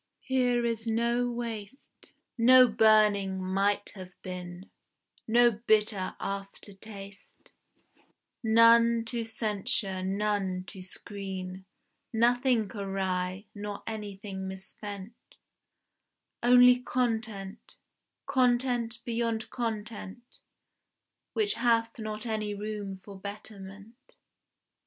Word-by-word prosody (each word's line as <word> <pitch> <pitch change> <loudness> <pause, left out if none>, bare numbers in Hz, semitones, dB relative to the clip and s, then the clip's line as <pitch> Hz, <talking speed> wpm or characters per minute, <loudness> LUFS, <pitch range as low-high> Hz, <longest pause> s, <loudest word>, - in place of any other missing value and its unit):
Here 250 -2 +1
is 230 -1 -2
no 235 +2 +1
waste, 235 0 -7 0.2
No 255 +1 +7
burning 210 -3 +4
Might 195 +2 0
have 185 -2 -10
been, 180 0 -7 0.6
No 240 +1 +5
bitter 215 -3 +1
after 195 +1 -6
taste, 200 -1 -12 0.9
None 230 +1 +5
to 230 0 -3
censure, 210 -3 -1
none 195 -1 -1
to 190 0 -9
screen, 190 0 -6 0.5
Nothing 240 -1 +2
awry, 190 -1 -2
nor 205 -1 -6
anything 200 -3 -6
misspent; 195 +2 -8 1.3
Only 250 +1 +7
content, 225 -5 -3 0.5
content 245 -3 +1
beyond 230 -1 -2
content, 225 -1 -4 1.1
Which 420 -2 +2
hath 230 -1 +1
not 215 0 -4
any 215 -2 -2
room 205 -2 -5
for 195 +1 -12
betterment. 200 +1 -9
215 Hz, 85 wpm, -29 LUFS, 195-235 Hz, 1.3 s, No